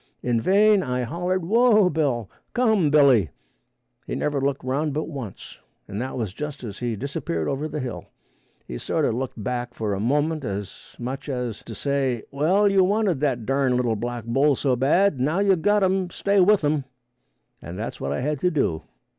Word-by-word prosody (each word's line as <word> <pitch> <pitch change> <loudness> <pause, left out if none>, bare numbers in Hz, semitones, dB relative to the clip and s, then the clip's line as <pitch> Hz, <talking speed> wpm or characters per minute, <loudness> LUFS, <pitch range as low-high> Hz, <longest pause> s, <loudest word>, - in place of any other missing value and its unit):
In 120 -2 +1
vain 205 - +4
I 125 -5 -2
hollered, 175 +7 -2
"Whoa, 215 0 +5
Bill; 140 - 0 0.3
come, 220 -10 +3
Billy," 135 - +5 0.8
he - - -3
never 145 -2 -1
looked 135 -1 -1
around 140 +3 -1
but 155 - 0
once, 135 - -8 0.3
and 100 +3 -4
that 130 +1 -4
was 110 -6 -3
just 150 +2 -6
as 105 -4 -7
he 120 -2 -2
disappeared 100 - -3
over 140 +3 -2
the 155 - -4
hill. 125 -4 -5 0.6
He - - -6
sort - - 0
a - - +1
looked 120 -2 -4
back 120 +1 -3
for 105 -2 -2
a 95 - -2
moment, 145 +7 0
as 100 -3 -6
much 130 +4 -5
as 125 -5 -3
to - - -8
say, 135 -5 -1
"Well 180 +9 +3
you 195 -1 +4
wanted 200 -5 +1
that 130 -6 -1
darn 135 0 +1
little 120 -3 +1
black 120 +1 -4
bull 135 +5 +3
so 130 0 +1
bad, 145 +5 +2
now 150 +7 +1
you 200 -1 +4
got 205 +4 +2
him 190 -1 +1
stay 200 +2 +1
with 195 0 +4
him," 145 -2 +1 0.8
and 85 +3 -8
that's 110 +3 -5
what - - -2
I - - -2
had 150 +1 -1
to 180 - +2
do. 135 - 0
140 Hz, 190 wpm, -24 LUFS, 120-175 Hz, 0.8 s, Whoa